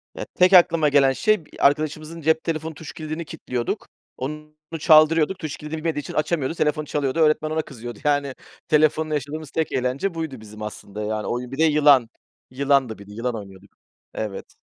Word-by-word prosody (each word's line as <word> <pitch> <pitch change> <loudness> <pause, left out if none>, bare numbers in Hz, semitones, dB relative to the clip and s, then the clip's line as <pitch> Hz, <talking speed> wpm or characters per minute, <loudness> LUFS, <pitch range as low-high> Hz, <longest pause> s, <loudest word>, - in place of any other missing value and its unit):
Ya, - - -5
tek 185 +1 +4
aklıma 165 -4 +6
gelen 140 -2 +4
şey, 215 0 +1
b - - -23
arkadaşımızın 155 +3 0
cep 160 +1 +2
telefonun 160 -1 -3
tuş 150 +1 -10
kilidini 155 +1 -5
kilitliyorduk, 125 -7 -4 0.3
onu 150 +3 -6 0.3
çaldırıyorduk. 155 +3 +5
Tuş 155 -4 -5
kilidini 150 +1 -6
bilmediği 155 -1 -2
için - - -7
açamıyordu. 155 -1 0
Telefonu 150 0 0
çalıyordu, 145 0 -1
öğretmen 155 0 +3
ona 160 0 0
kızıyordu. 120 -6 -9
Yani 145 -2 +1 0.3
telefonla 155 0 +2
yaşadığımız 150 +1 -4
tek 160 -1 -1
eğlence 130 +9 -1
buydu 160 -6 -5
bizim 105 0 -12
aslında. 105 0 -6
Yani 105 0 -3
oyun 125 +1 -3
bir 135 - -6
de 160 - +3
yılan, 145 -6 +5 0.4
yılandı 135 -3 +1
bir 100 0 -13
de - - -12
yılan 115 +2 -3
oynuyorduk. 95 -3 -11 0.4
Evet. 105 -3 -6
150 Hz, 175 wpm, -23 LUFS, 130-155 Hz, 0.4 s, aklıma